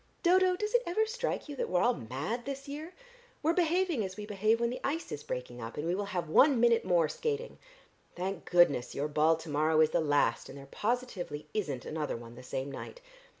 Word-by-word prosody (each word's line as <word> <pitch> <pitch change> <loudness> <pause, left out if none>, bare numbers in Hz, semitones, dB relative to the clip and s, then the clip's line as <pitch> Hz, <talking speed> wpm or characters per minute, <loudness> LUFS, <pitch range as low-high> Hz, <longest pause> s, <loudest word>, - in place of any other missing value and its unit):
Dodo, 370 +1 +5
does 420 +4 -3
it 485 - +5
ever 430 +6 +2
strike 480 -2 -3
you 290 - -6
that - - -2
we're 180 -1 +2
all 245 - +4
mad 140 - -4
this 275 0 -5
year? 305 +5 -7 0.5
We're 320 +2 +3
behaving 345 - +1
as 190 0 -6
we 210 - -5
behave 215 +2 +1
when 235 0 +1
the 250 - -5
ice 315 +4 -2
is 145 - -4
breaking 125 -3 -5
up, 115 +1 -7
and 150 - -3
we 170 - +1
will 200 +2 -1
have 180 -4 -3
one 260 - +5
minute 235 -1 +4
more 170 -3 +3
skating. 460 - -3 0.6
Thank 185 0 -4
goodness 160 -8 +4
your 145 +2 -1
ball 155 +2 +3
to 160 0 -9
morrow 155 +2 +2
is 155 0 +5
the - - +2
last, 145 -2 +1
and 140 - -9
there 140 - -10
positively 185 - -3
isn't 145 -12 -2
another 155 -5 -3
one 115 0 -11
the 125 - -11
same 135 +2 -4
night. 470 - -8
190 Hz, 220 wpm, -31 LUFS, -, 0.6 s, Dodo